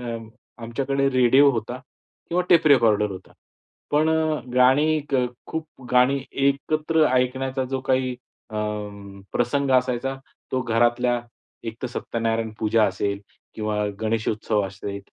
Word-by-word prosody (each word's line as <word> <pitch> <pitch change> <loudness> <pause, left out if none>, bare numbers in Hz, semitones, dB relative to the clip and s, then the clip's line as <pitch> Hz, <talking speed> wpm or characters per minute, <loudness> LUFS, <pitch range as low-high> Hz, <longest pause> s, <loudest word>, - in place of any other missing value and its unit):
अ, 115 +1 -13
आमच्याकडे 135 +4 0
रेडिओ 130 +2 +5
होता 120 0 -4 0.5
किंवा 175 +2 +1
टेप 165 -2 +5
रेकॉर्डर 110 -7 +4
होता. 95 -1 -10 0.6
पण 155 +2 +3
अ, 160 -2 +1 0.2
गाणी 145 +5 +4 0.5
खूप 160 -1 -4 0.3
गाणी 125 +2 +4 0.3
एकत्र 155 +3 +1
ऐकण्याचा 130 +1 0
जो 135 - 0
काही 130 0 +2 0.4
अ, 110 - -8 0.8
प्रसंग 135 +3 +1
असायचा 125 +1 -3 0.4
तो 130 - 0
घरातल्या 120 +1 +2 0.5
एकतर 115 +3 -5
सत्यनारायण 115 -2 -2
पूजा 110 +1 +3
असेल 100 +1 -2 0.4
किंवा 105 -1 -1 0.2
गणेशोत्सव 110 -1 0
असेल 100 +1 -6
125 Hz, 115 wpm, -23 LUFS, 115-140 Hz, 0.8 s, रेडिओ